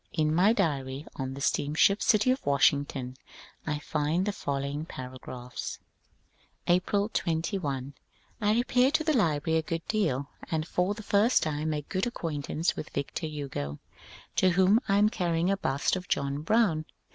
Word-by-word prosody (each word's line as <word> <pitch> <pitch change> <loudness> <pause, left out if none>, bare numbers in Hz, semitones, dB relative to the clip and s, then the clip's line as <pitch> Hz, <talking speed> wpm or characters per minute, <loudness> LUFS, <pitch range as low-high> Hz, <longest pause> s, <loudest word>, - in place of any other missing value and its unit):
In 155 -2 +1
my 185 +6 +5
diary 140 - -1
on 135 0 -3
the 140 - -7
steamship 155 +10 +2
City 215 +4 +4
of 260 - -1
Washington 140 -2 +1 0.5
I 150 -1 0
find 155 +4 -1
the 205 - 0
following 140 -2 -3
paragraphs: 125 -3 -7 0.5
— - - -38
April 185 +3 +2
21. 160 - -2 0.5
I 210 0 +3
repair 250 +2 +3
to 310 +2 +1
the 310 -1 +1
library 160 - +2
a - - 0
good 165 +1 -4
deal, 145 - 0 0.2
and 160 -1 -1
for 180 +5 0
the 220 - -9
first 205 +5 +3
time 155 0 -1
make 150 -2 -3
good 190 +3 -1
acquaintance 160 - -2
with 155 - -6
Victor 140 +3 -3
Hugo, 135 - -5 0.6
to 185 - +5
whom 190 +4 +4
I 195 - +3
am 210 +1 +5
carrying 175 -2 0
a 195 - +1
bust 140 -3 0
of 180 -1 -5
John 140 +1 -1
Brown. 165 -4 +2
160 Hz, 160 wpm, -28 LUFS, 140-195 Hz, 0.6 s, my